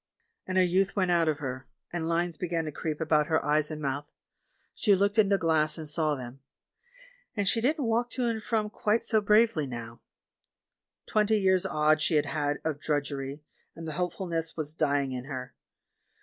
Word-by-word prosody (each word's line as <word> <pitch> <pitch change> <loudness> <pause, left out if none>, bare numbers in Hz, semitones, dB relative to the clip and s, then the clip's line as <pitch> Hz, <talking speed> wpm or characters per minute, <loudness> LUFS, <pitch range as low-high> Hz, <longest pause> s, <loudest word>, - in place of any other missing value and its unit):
And 185 - -1
her 185 - +6
youth 185 +2 +1
went 185 -3 +2
out 170 -2 +3
of 150 - 0
her, 130 -3 -5 0.3
and 165 -2 -2
lines 170 0 0
began 170 -2 -2
to 155 - -4
creep 155 0 -4
about 155 -2 +2
her 160 -1 +1
eyes 150 0 +2
and 155 -1 -5
mouth 145 0 -3 0.3
— - - -44
she 205 -3 +3
looked 200 +3 +1
in 205 -2 +5
the 200 - +4
glass 160 -3 +2
and 160 -1 -6
saw 155 0 +1
them 125 0 -8 0.5
— - - -26
and 200 -1 0
she 225 +3 +3
didn't 285 +3 +1
walk 235 +2 +1
to 250 - -1
and 230 -2 -1
from 215 -1 -1
quite 215 +2 +1
so 225 -2 +2
bravely 210 -7 +3
now. 120 -2 -7 1.1
Twenty 215 0 +2
years 190 -2 +3
odd 155 0 +2
she 160 - +1
had 150 -1 +3
had 145 0 -1
of 155 -3 -1
drudgery, 140 -1 -2 0.3
and 165 0 -7
the - - -3
hopefulness 170 -1 -2
was 155 -1 -3
dying 145 -4 +1
in 125 -1 -5
her. 130 -2 -6
165 Hz, 195 wpm, -28 LUFS, 150-205 Hz, 1.1 s, her